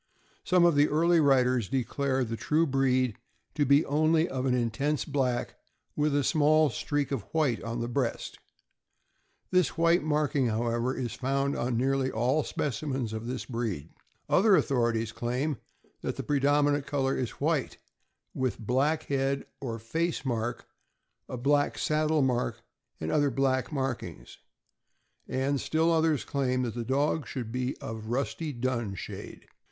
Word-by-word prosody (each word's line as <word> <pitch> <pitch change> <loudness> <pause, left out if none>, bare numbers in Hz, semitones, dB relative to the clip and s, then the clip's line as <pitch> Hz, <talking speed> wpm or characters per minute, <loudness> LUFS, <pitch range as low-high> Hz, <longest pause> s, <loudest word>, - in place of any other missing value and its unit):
Some 180 -1 +4
of 170 - +5
the 145 +1 +4
early 170 +3 +3
writers 130 -6 +3
declare 135 +1 0
the 115 -1 -3
true 155 +7 +1
breed 130 -4 +1 0.4
to 145 -3 +1
be 140 +4 +5
only 155 +3 +2
of 130 0 -2
an 125 - +2
intense 125 +5 0
black, 130 -4 -1 0.4
with 150 -1 +1
a 145 - +2
small 155 0 +3
streak 145 +5 -2
of 135 -5 -1
white 150 -8 +1
on 115 +1 -4
the 120 - -2
breast. 120 0 -2 1.1
This 180 -2 +2
white 170 +2 +4
marking, 150 -3 +1
how 115 +1 -1
ever, 120 +3 0
is 120 -3 -3
found 140 +1 -1
on 120 -1 -1
nearly 135 +1 +1
all 130 +7 +1
specimens 130 -3 -3
of 110 +1 -5
this 125 +1 -4
breed. 110 - -4 0.4
Other 200 +1 +5
authorities 115 -7 +1
claim 125 +5 -2 0.4
that - - -3
the - - -5
predominant 145 0 +2
color 135 -2 0
is 125 -3 -4
white, 150 -2 0 0.6
with 130 -5 -1
black 135 +8 0
head 140 0 -1
or 115 -4 -4
face 160 +8 -2
mark, 120 -2 -2 0.6
a 130 - -4
black 145 +3 +1
saddle 155 -1 +1
mark, 125 -3 -1 0.4
and 80 - -3
other 145 -2 +3
black 130 +1 0
markings; 135 -4 -4 0.9
and 135 +1 0
still 160 +1 +1
others 160 -3 +2
claim 130 -2 0
the 120 0 -3
dog 140 +4 0
should 120 -4 -5
be 125 +2 -2
of 115 - -6
a 110 0 -9
rusty 140 +5 -2
dun 120 -5 -2
shade. - - -8
135 Hz, 150 wpm, -28 LUFS, 120-150 Hz, 1.1 s, of